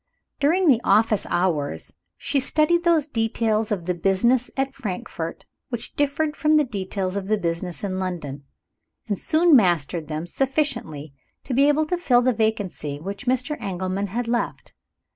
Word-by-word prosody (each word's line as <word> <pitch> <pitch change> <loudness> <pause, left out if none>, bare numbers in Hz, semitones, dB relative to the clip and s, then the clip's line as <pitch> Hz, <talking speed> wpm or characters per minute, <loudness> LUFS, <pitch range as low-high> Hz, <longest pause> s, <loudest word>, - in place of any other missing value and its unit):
During 340 +6 +3
the 245 -6 +5
office 215 +1 +3
hours, 165 -6 -1 0.2
she 280 0 0
studied 305 +5 +2
those 335 -4 +3
details 225 -4 0
of 185 -5 -2
the 180 - 0
business 195 +8 +2
at 270 0 0
Frankfort 185 -8 -5 0.2
which 240 -3 -5
differed 295 +2 0
from 305 0 +3
the 300 - +4
details 195 -4 -3
of 195 -1 -3
the 215 +1 +2
business 170 -2 -3
in 190 -2 -2
London; 160 -7 -4 0.6
and 205 -3 -2
soon 325 0 +4
mastered 170 - +2
them 155 +1 -4
sufficiently 175 - -2 0.3
to 265 - -4
be 275 +3 +4
able 295 +1 +3
to 350 +3 -2
fill 245 -8 +3
the 255 0 +3
vacancy 205 -10 -2
which 200 +7 -7
Mr. 260 +4 0
Engelman 190 +1 -2
had 235 +5 -3
left. 235 0 -2
220 Hz, 160 wpm, -23 LUFS, 185-275 Hz, 0.6 s, the